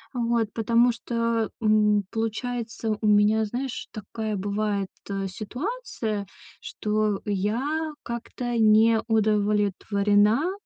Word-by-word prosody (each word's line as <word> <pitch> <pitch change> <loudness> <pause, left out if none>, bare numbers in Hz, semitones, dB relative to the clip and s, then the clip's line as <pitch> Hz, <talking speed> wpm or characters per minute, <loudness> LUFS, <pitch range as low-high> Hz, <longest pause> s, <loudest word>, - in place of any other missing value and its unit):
вот 235 -2 +1
потому 235 +2 +3
что, 230 -1 -1
м, 210 -1 +3
получается 225 -1 -3
у - - -2
меня, 210 +1 +4
знаешь, 245 +4 -4
такая 215 0 -4
бывает 200 0 -1 0.4
ситуация, 225 - -4 0.3
что 210 -1 -1
я 245 +11 -1
как-то 235 +1 -4
не 220 +1 +5
удовлетворена 210 - +2
220 Hz, 90 wpm, -25 LUFS, 210-235 Hz, 0.4 s, не